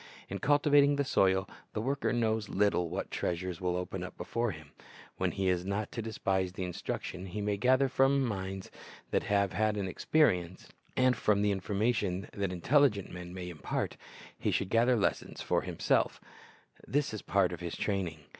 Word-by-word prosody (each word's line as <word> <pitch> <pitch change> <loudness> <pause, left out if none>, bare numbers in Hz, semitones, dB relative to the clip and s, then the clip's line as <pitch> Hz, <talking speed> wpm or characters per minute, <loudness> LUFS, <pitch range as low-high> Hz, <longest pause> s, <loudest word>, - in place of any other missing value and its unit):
In 100 - -4
cultivating 145 0 +4
the 140 - +1
soil 95 -6 +2 0.3
the - - -2
worker 135 +5 0
knows 110 -3 0
little 95 -4 +2
what - - -4
treasures 90 0 -2
will 90 -1 0
open 90 +1 -3
up 90 - -8
before 120 0 -1
him. 75 -5 -9 0.5
While - - +1
he 95 -1 -1
is 90 -1 +2
not 100 +2 -2
to 115 - -4
despise 95 -4 -1
the 95 - -4
instruction 90 +1 -4
he 95 +4 -5
may 105 0 0
gather 130 +5 +3
from 135 +1 +3
minds 95 -3 -4 0.4
that - - +2
have 100 -2 +2
had 110 0 +1
an 100 -2 -1
experience, 90 - +1 0.3
and 130 -1 +4
from 105 -2 +2
the 105 - +3
information 100 0 0
that 100 -2 -2
intelligent 105 - +2
men 90 0 -7
may 90 -1 -6
impart, 85 -4 -3 0.4
he - - 0
should 95 - 0
gather 120 +3 +4
lessons 105 - -1
for - - +1
himself - - 0 0.7
This 145 -4 0
is 110 - -4
a - - -27
part 95 -3 +2
of 85 - -6
his 85 -1 -4
training. 90 -6 -2
100 Hz, 180 wpm, -31 LUFS, 90-115 Hz, 0.7 s, cultivating